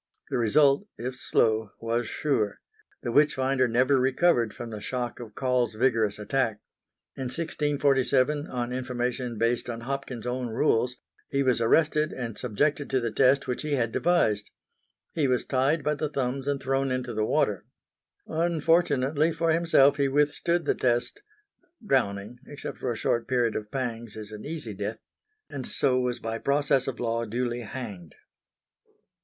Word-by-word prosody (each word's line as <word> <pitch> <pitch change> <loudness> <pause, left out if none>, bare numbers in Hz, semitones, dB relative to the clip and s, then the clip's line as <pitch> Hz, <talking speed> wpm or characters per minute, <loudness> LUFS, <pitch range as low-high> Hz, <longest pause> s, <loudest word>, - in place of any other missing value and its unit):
The - - +1
result, 140 - +4
if 125 +2 -4
slow, 110 -4 +1
was 115 0 -1
sure. 110 -9 -1 0.4
The 120 - -2
witch 145 +3 +4
finder 130 -1 +2
never 130 +4 +3
recovered 130 -2 +2
from 115 +2 -8
the 105 -1 -6
shock 125 +1 -3
of 115 -3 -9
Caule's 125 -4 0
vigorous 115 -3 +2
attack. 110 0 -1 0.6
In 130 - -4
1647, 145 -1 +1
on 125 0 -3
information 125 -1 -2
based 115 +2 0
on 115 -1 -5
Hopkins' 130 -2 -5
own 125 0 -2
rules, 125 0 +1 0.3
he 140 0 +1
was 125 -3 +2
arrested 155 +5 +3
and 115 -4 -5
subjected 145 +5 -1
to 130 - +2
the 120 -2 -2
test 135 +3 +3
which 125 - -2
he 150 -1 -2
had 115 -5 +1
devised: 105 -11 +1 0.6
he 150 -4 +1
was 125 -1 +1
tied 140 +4 +1
by 150 +2 +1
the 150 0 -2
thumbs 135 -1 -2
and 140 -1 0
thrown 135 +1 0
into 130 -1 -2
the 110 0 0
water. - - +1 0.6
Unfortunately 160 -2 +2
for 165 0 0
himself 160 -4 +4
he 140 -1 +2
withstood 150 +4 +1
the - - +3
test 120 - 0 0.6
drowning, 110 - 0
except 145 - -7
for 125 - -1
a 115 - -4
short 115 +1 0
period 120 -3 +1
of 105 -1 -4
pangs, 120 -4 -4
is 105 -1 -8
an 105 0 -8
easy 150 -8 -5
death 105 +3 -4 0.5
and 130 -3 -6
so 130 -2 +2
was 125 -1 -1
by 115 -1 -4
process 140 -1 +2
of 135 - -4
Law 115 -1 -1
duly 120 +2 -2
hanged. 105 - -7
130 Hz, 160 wpm, -27 LUFS, 115-140 Hz, 0.6 s, result